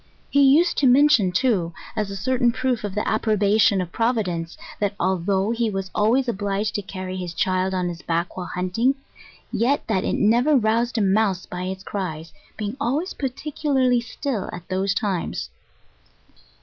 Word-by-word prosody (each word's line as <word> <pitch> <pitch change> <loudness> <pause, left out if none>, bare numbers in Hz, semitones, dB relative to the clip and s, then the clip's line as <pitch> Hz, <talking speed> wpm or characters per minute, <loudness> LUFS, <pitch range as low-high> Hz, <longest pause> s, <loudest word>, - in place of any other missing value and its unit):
He 285 - +4
used 295 +6 +5
to 275 - +4
mention, 250 -7 +5
too, 180 -5 +1 0.2
as 210 -2 -1
a 200 - -5
certain 245 +4 +1
proof 255 -2 -1
of 205 -2 -4
the 210 - -1
approbation 215 -1 +3
of 175 -1 -5
Providence, 190 -8 -1 0.2
that 205 -1 -1
although 190 +3 +1
he 230 -1 0
was 195 -2 -4
always 245 +5 +2
obliged 205 -1 -1
to 205 - -2
carry 185 -1 -6
his 175 -2 -5
child 185 +2 0
on 180 -1 0
his 175 -1 -6
back 170 +1 -2
while 180 -1 -5
hunting, 185 +9 0 0.6
yet 270 +6 +1
that 195 -4 0
it - - 0
never 240 +8 +3
roused 235 +2 +1
a - - +2
mouse 195 -1 +2
by 180 0 -5
its 190 +1 -5
cries, 165 -6 -5 0.2
being 210 +2 -3
always 290 +8 -1
particularly 270 -2 0
still 240 -3 -4
at 175 0 -9
those 195 +1 0
times. 200 -5 -2
205 Hz, 165 wpm, -23 LUFS, 185-245 Hz, 0.6 s, used